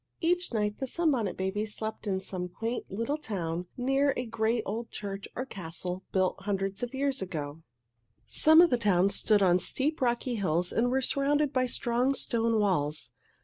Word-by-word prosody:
Each 355 +1 +1
night 210 -2 -1
the 265 - -2
Sunbonnet 260 - 0
Babies 205 +3 -2
slept 220 0 -5
in 190 -2 0
some 185 -2 -5
quaint 230 +6 -4
little 230 +10 -2
town 175 - -3
near 270 +2 +2
a 250 - -2
great 225 0 0
old 225 +3 -4
church 200 -1 -6
or 255 - -3
castle 180 -3 -5
built 185 -1 +1
hundreds 195 -1 -2
of 245 +2 -4
years 275 -2 0
ago. 155 -4 -5 0.6
Some 315 +2 +6
of 345 - +5
the 245 - +4
towns 200 -3 +3
stood 210 0 +3
on 180 -1 +4
steep, 295 - -1
rocky 245 0 0
hills 180 -5 0
and 240 +2 +1
were 265 +1 +1
surrounded 285 +2 +1
by 255 -1 +2
strong, 245 +3 +1
stone 230 -3 +1
walls. 150 - 0
220 Hz, 175 wpm, -29 LUFS, 190-260 Hz, 0.6 s, Some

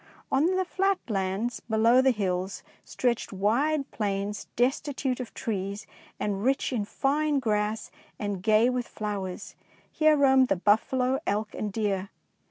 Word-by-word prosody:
On 275 +4 +3
the 375 0 +1
flat 390 +2 +1
lands 195 +4 -1
below 230 +3 +3
the 265 - +4
hills 190 -4 -2 0.2
stretched 240 -2 -1
wide 270 +9 +1
plains 205 -1 -2
destitute 265 +1 0
of 250 - -6
trees 200 -1 -3 0.3
and 200 -1 -2
rich 270 +1 +1
in 215 -4 -1
fine 290 +6 0
grass 215 -3 -1 0.3
and 205 -3 -3
gay 215 +3 +4
with 250 -1 -1
flowers. 200 -4 -5 0.4
Here 310 -1 +4
roamed 265 -2 +5
the 195 - +2
buffalo, 250 +7 +2
elk, 210 +1 -1
and 210 - -3
deer. 195 -2 -1
225 Hz, 140 wpm, -27 LUFS, 205-265 Hz, 0.4 s, roamed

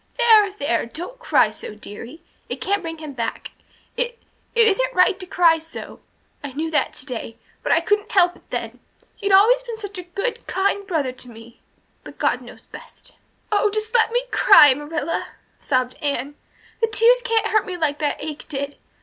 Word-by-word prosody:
"There 440 -4 +5
there 235 - 0
don't 355 - -8
cry - - +3
so, 215 - -8
dearie. 230 +9 -9 0.3
It - - -4
can't 400 0 0
bring 325 -1 -6
him 310 -2 -8
back. 230 -3 -4 0.4
It 480 -1 -2 0.4
it 460 -1 +6
isn't - - +1
right 365 +1 +4
to 370 - -8
cry 335 -3 +4
so. 325 +1 -10 0.4
I 280 -2 -6
knew 320 +3 -3
that 310 - 0
today, 240 -3 -7 0.2
but - - -2
I - - +4
couldn't 415 -1 0
help 360 -3 +4
it - - -23
then. - - -5 0.4
He'd 405 -2 -2
always 440 +6 +6
been 475 -3 -7
such 405 -3 -6
a 350 0 -12
good, 485 +5 -2
kind 400 +1 0
brother 305 -8 -1
to 250 0 -9
me 230 0 -14 0.4
but - - -12
God - - 0
knows - - -12
best." - - -14 0.4
"Oh, 420 0 +3
just 430 +2 -3
let 465 -1 +3
me 485 +1 +1
cry, 290 -3 +7
Marilla," 300 +3 -4 0.3
sobbed 255 -2 0
Anne. 280 -1 -2 0.5
"The 455 - +3
tears 460 +3 +4
don't 455 -2 +1
hurt 435 -1 +1
me 365 -1 -5
like 300 -3 -1
that 295 -2 -1
ache 305 -1 -7
did. 280 -1 -4
355 Hz, 185 wpm, -21 LUFS, 285-430 Hz, 0.5 s, cry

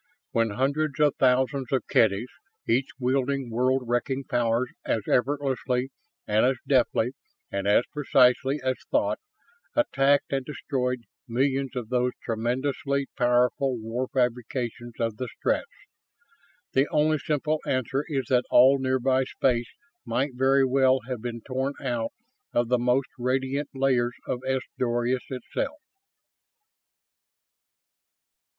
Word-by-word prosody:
When 115 -1 +2
hundreds 140 +6 -1
of 150 -2 +4
thousands 130 0 +2
of 130 -4 +1
Kedys, 110 +2 +2 0.4
each 130 +4 +2
wielding 130 0 0
world 130 +3 +1
wrecking 120 +3 -1
powers 120 0 0
as 110 - -1
effortlessly 130 -1 0 0.3
and 105 +1 +2
as 130 +1 +3
deftly 125 -3 +2 0.4
and 100 0 -2
as 105 +4 +5
precisely 135 -1 +3
as 130 -1 0
thought, - - +1 0.6
attacked 140 - +2
and 135 -1 0
destroyed 125 -3 -2 0.2
millions 135 +2 0
of 120 -3 -4
those 125 0 +1
tremendously 130 +4 -1
powerful 125 +1 +2
war 115 +4 -3
fabrications 120 -1 -2
of 115 -2 -1
the 130 - -3
Stretts? - - 0 1.0
The 135 +2 +3
only 155 0 +2
simple 150 +2 -1
answer 130 +2 0
is 135 -4 -1
that 125 -1 +3
all 135 +2 +6
nearby 130 0 +1
space 120 -2 0 0.3
might 125 +4 -1
very 135 +2 +3
well 130 0 +3
have 125 -4 -4
been 120 -1 -5
torn 130 +2 -2
out 120 -4 -2 0.4
of 120 -1 +1
the 125 -1 +3
most 125 +2 +1
radiant 130 +3 -1
layers 125 -3 +1
of 125 - -2
S 130 0 +1 0.2
Doradus 120 +1 0
itself. 135 - -4
130 Hz, 125 wpm, -26 LUFS, 120-135 Hz, 1.0 s, all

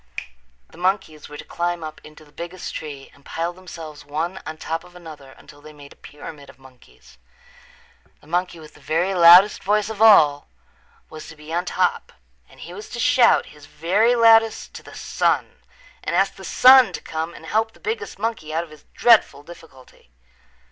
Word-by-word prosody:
The 165 - -17
monkeys 180 -5 -2
were 150 - -10
to - - -9
climb 175 -1 -3
up 155 0 -9
into 155 0 -15
the 145 - -23
biggest 175 +3 -8
tree 140 -3 -8
and 140 - -23
pile 165 +4 -4
themselves 165 -4 -11
one 160 +6 -4
on 155 - -7
top 165 +1 -5
of 180 - -18
another 155 -6 -13
until 145 - -17
they 155 +1 -14
made 145 -1 -15
a - - -28
pyramid 145 -1 -12
of - - -17
monkeys. 125 - -21 1.0
The - - -23
monkey 175 +1 -3
with 155 -1 -14
the - - -19
very 175 +5 -1
loudest 180 +3 +7
voice 210 +1 0
of 215 -1 -8
all 155 -10 +5 0.6
was 155 -1 -10
to 165 - -12
be 150 +1 -11
on 175 +2 -1
top - - -1 0.4
and - - -18
he 175 - -10
was 205 +3 -10
to 240 - -7
shout 290 -2 +3
his 150 -1 -16
very 195 +12 +1
loudest 225 -1 +3
to - - -10
the - - -14
sun - - -2 0.4
and - - -3
ask - - +1
the - - -14
sun 260 -1 +6
to - - -6
come 160 +1 -5
and - - -13
help 220 +1 -1
the - - -21
biggest 440 0 -5
monkey 215 -7 -4
out 165 +2 -2
of 165 - -15
his 155 -1 -17
dreadful 225 -11 +3
difficulty. 145 - -17
165 Hz, 190 wpm, -21 LUFS, 150-195 Hz, 1.0 s, loudest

